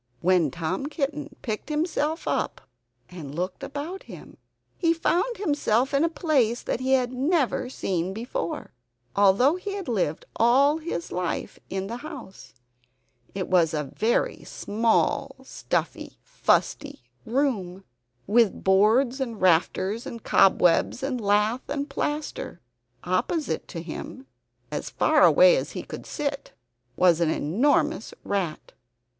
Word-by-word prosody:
When 180 -4 +3
Tom 170 - -3
Kitten 300 0 -3
picked 215 +4 -4
himself 310 +1 -1
up - - -1 0.5
and 150 -6 -9
looked 180 +2 -3
about 305 +7 -5
him, - - -12 0.4
he 335 -1 +2
found 380 +8 0
himself 285 - +1
in 280 +2 +3
a 335 - +2
place 275 -8 +1
that - - -2
he 260 +1 +1
had 255 -1 +2
never 265 -2 0
seen 185 -7 -2
before, 220 -5 -4 0.4
although 205 - +4
he 400 +2 -5
had 390 -5 -6
lived 185 -10 -1
all 275 +6 +4
his 310 - -5
life 180 -1 -3
in 190 0 -3
the 230 +4 -5
house. 265 - -10 0.8
It 190 -2 -2
was 170 -4 +3
a 150 -3 -3
very 225 +2 0
small 230 +5 0
stuffy - - -3
fusty - - 0 0.2
room, 220 -8 -1 0.4
with 225 0 +2
boards, 225 +8 +3
and 235 -5 -3
rafters, 185 +5 +2
and 230 -2 -8
cobwebs, 180 +6 +3
and 260 -3 -2
lath 210 +4 +1
and 285 0 -2
plaster. 295 +2 -4 0.4
Opposite 325 -4 -1
to 170 -3 -6
him 260 +10 -8 0.5
as - - -4
far - - +2
away - - +7
as - - -4
he - - -5
could - - -9
sit 285 -1 -4 0.4
was 175 -2 +4
an 165 - +3
enormous 220 - +1
rat. 185 -6 -3
240 Hz, 130 wpm, -25 LUFS, 190-290 Hz, 0.8 s, away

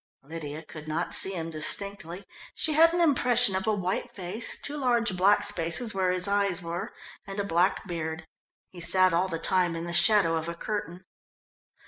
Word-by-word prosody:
Lydia 155 0 -8
could 155 0 -12
not 160 +3 -2
see 195 - +4
him 165 -2 -5
distinctly. 180 +3 0 0.3
She 310 - -1
had 325 +2 +5
an 345 +1 -1
impression 245 - +3
of 190 +3 -3
a 220 - +2
white 185 -1 -3
face, 195 +4 -2
two 290 - -2
large 240 -7 0
black 200 +3 +3
spaces 205 +4 0
where 190 -1 0
his 180 0 0
eyes 200 -3 0
were 170 0 -6 0.4
and 195 +1 -7
a - - 0
black 180 0 0
beard. 160 -2 -5 0.5
He 180 - -12
sat 185 +1 +4
all 175 +3 +1
the 165 -3 -4
time 175 0 +1
in 165 +1 -5
the 170 - -5
shadow 175 -3 +4
of 160 +1 -4
a 170 - -6
curtain. 185 -1 -6
185 Hz, 185 wpm, -26 LUFS, 165-205 Hz, 0.5 s, had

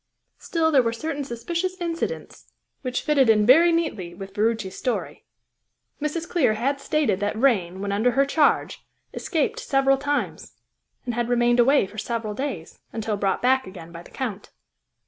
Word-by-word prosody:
Still 325 -1 0
there 275 -4 +5
were 230 -1 -1
certain 290 +4 -4
suspicious 340 +9 -3
incidents 340 +7 -4 0.3
which 255 -2 -3
fitted 280 -5 +3
in 210 -1 +5
very 325 +9 +7
neatly 220 - -2
with 195 +1 -9
Ferruci's 215 -2 -1
story. 250 - -3 0.8
Mrs. 320 +3 -2
Clear 270 -11 +2
had 275 +5 -1
stated 275 -11 +1
that 205 +1 -1
Vrain, 195 -7 +1
when 200 0 -2
under 220 +5 +2
her 275 +2 +3
charge, 295 +2 +1 0.3
escaped 320 -6 -1
several 270 -1 +2
times, 290 +1 -3 0.5
and 240 - -2
had 240 0 -1
remained 240 0 +3
away 270 0 +5
for 210 +3 -9
several 225 -1 -3
days, 215 - -5
until 220 -1 -2
brought 195 +1 -1
back 260 -1 +3
again 175 -3 -10
by 170 0 -9
the - - -15
Count. 220 -7 -5
245 Hz, 165 wpm, -24 LUFS, 210-290 Hz, 0.8 s, very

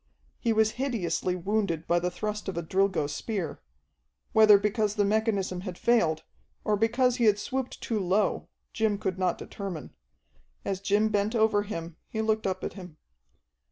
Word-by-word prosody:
He 230 - +1
was 220 0 +3
hideously 200 -8 -1
wounded 180 -3 -1
by 175 0 +2
the 180 +1 -1
thrust 210 +3 -4
of 185 - -5
a 170 - -1
Drilgo 190 -1 +1
spear 185 +5 -4 0.7
whether 215 -2 +8
because 210 +1 0
the 205 -2 +2
mechanism 200 -4 0
had 185 -2 -6
failed, 170 -10 +2 0.4
or 210 - +2
because 240 +4 +2
he 240 - +2
had 210 -2 +5
swooped 260 +4 -3
too 225 -2 -1
low, 195 +3 +1 0.3
Jim 220 -2 +1
could 190 -2 -3
not 180 -2 +1
determine. 190 -7 -7 0.7
As 195 -1 -1
Jim 205 +2 +2
bent 210 +2 0
over 220 -2 +3
him 170 -6 -6
he 220 - -5
looked 220 -1 +1
up 185 0 -3
at - - -3
him. 180 -5 -10
205 Hz, 165 wpm, -28 LUFS, 185-220 Hz, 0.7 s, whether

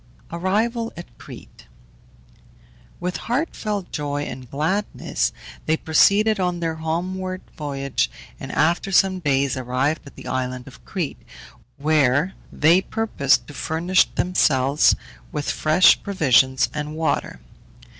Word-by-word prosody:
ARRIVAL 220 +7 -1
AT 170 -9 -10
CRETE. - - -13 1.3
With 180 +1 -3
heartfelt 220 - -3
joy 145 -1 -2
and 130 -4 -8
gladness 160 +10 -1 0.4
they 160 +1 +2
proceeded 205 +7 +3
on 180 -1 0
their 165 -1 -2
homeward 185 +3 -3
voyage, 140 - -2 0.3
and - - -7
after 170 +4 +1
some 190 0 +3
days 140 -4 +1
arrived 130 +4 -1
at - - -13
the - - -12
island 130 -1 -3
of 135 - -14
Crete, 175 -8 -4 0.6
where 150 +2 +2 0.2
they 165 +5 +4
purposed 200 - +1
to 145 - -11
furnish 170 +5 +2
themselves 140 -6 +3 0.4
with 145 - -2
fresh 155 +4 +4
provisions 130 -8 +3
and 150 0 -4
water. 160 - -1
160 Hz, 115 wpm, -22 LUFS, 140-185 Hz, 1.3 s, they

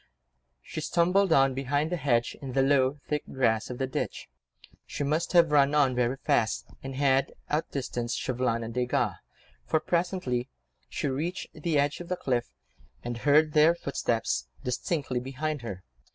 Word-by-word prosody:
She - - -6
stumbled 180 +2 +2
on 135 -3 +5
behind 145 +4 -1
the - - +1
hedge 125 -7 +1
in 135 -3 -6
the 135 0 +3
low, 135 0 +3
thick 150 -1 -1
grass 110 -4 +1
of 125 - -5
the 135 - 0
ditch. 130 - -4 0.6
She - - -3
must 155 +6 0
have 170 -3 +6
run 145 0 +4
on 140 -3 +4
very 125 +1 0
fast, 110 -3 +1 0.2
and 135 0 -6
had 135 -1 +2 0.2
outdistanced 130 -6 -2
Chauvelin 125 -2 -1
and 115 0 -6
Desgas, 125 0 0 0.5
for 155 - +1
presently 170 -8 -1 0.4
she - - -2
reached 160 +8 -3
the 155 0 -1
edge 145 +1 +1
of 175 - -8
the 180 +1 -2
cliff, 125 -6 -1 0.5
and 120 -1 -4
heard 150 +3 +4
their 155 +2 +6
footsteps 115 - -1 0.2
distinctly 130 0 -1
behind 140 +3 -3
her. 100 -6 -7
135 Hz, 160 wpm, -28 LUFS, 125-155 Hz, 0.6 s, have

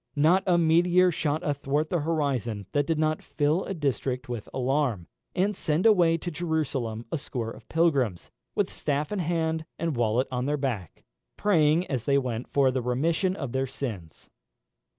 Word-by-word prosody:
Not 160 +6 +4
a 175 -2 +4
meteor 175 +2 +4
shot 155 -1 -1
athwart 145 +1 -1
the 175 - +2
horizon 135 -10 -1
that 145 -1 +1
did 165 - +1
not 155 0 +1
fill 150 +4 0
a 195 - -4
district 135 -4 -2
with 120 -4 -5
alarm, 130 - 0 0.3
and 195 +3 +1
send 160 +2 0
away 175 -7 +5
to 175 +2 -5
Jerusalem 140 -9 -2
a 165 - -1
score 120 -4 -4
of - - -13
pilgrims, 140 - +1 0.2
with - - 0
staff 145 +3 -2
in 205 - -1
hand 160 -2 0
and 165 -3 -1
wallet 120 +2 +1
on 125 +1 -1
their 150 +1 +1
back, 120 - -4 0.3
praying 165 -4 +3
as 125 -8 -3
they 140 0 +3
went 125 -3 -2
for 135 -2 +3
the 130 0 -1
remission 160 +10 0
of 135 -9 -5
their 135 +1 0
sins. 115 - -7
145 Hz, 170 wpm, -27 LUFS, 125-165 Hz, 0.3 s, away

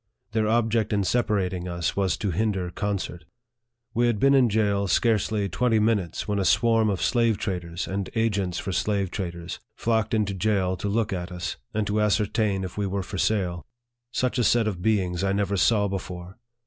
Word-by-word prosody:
Their 110 0 +1
object 115 -1 +1
in 100 -1 +2
separating 95 -5 0
us 85 -2 -2
was 95 -6 +1
to 100 +1 -1
hinder 95 -2 -1
concert. 95 -3 -3 0.7
We 120 +1 +2
had 115 -4 0
been 135 +4 +5
in 130 -3 +5
jail 100 -2 +1
scarcely 105 +1 +1
twenty 115 +5 +1
minutes, 105 -6 0
when 105 -1 0
a - - +1
swarm 110 +3 +3
of 95 -3 -1
slave 115 -3 +2
traders, 90 -4 -3
and 95 0 -3
agents 100 -6 0
for 95 - -3
slave 100 +1 0
traders, 85 -3 -5 0.2
flocked 110 -1 0
into 105 -2 0
jail 95 -1 +1
to 100 - -3
look 110 0 0
at 90 0 -4
us, 90 -1 -4
and 110 -1 -1
to 105 +1 0
ascertain 105 -1 +1
if 95 +2 -6
we 100 - 0
were 95 0 -2
for 95 +1 -5
sale. 90 -5 0 0.5
Such 125 0 0
a - - +3
set 115 0 +3
of 95 -5 -3
beings 95 -4 +1
I 95 0 +1
never 100 0 0
saw 105 +1 +3
before 90 0 -6
100 Hz, 185 wpm, -25 LUFS, 95-110 Hz, 0.7 s, been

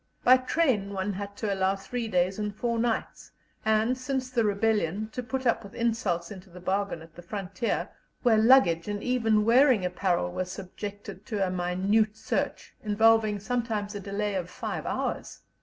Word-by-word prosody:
By 255 +1 +7
train 255 -7 0
one 195 +1 -2
had 200 +1 -6
to 210 -3 -1
allow 190 0 +1
three 230 +4 -4
days 185 0 +1
and 210 -1 -3
four 235 +1 -1
nights, 230 -1 -2 0.3
and, 220 +3 +2
since 255 0 -3
the 240 -2 +2
rebellion, 210 -1 0
to 250 - -4
put 260 +2 -4
up 235 - +2
with 200 - -12
insults 215 -7 -1
into 190 -1 -10
the 180 +1 -12
bargain 190 -2 -2
at 165 0 -16
the 175 - -11
frontier, 195 +5 -3 0.4
where 230 -3 +5
luggage 220 -8 +5
and 205 0 -3
even 225 -4 +2
wearing 245 -3 +5
apparel 180 - 0
were 185 - -2
subjected 200 +1 -8
to 205 -3 0
a 185 - -2
minute 190 +5 +1
search, - - -3
involving 215 0 +3
sometimes 220 -2 -2
a 205 - -5
delay 200 +1 -2
of 180 -2 -3
five - - -5
hours. - - -3
210 Hz, 175 wpm, -28 LUFS, 190-230 Hz, 0.4 s, By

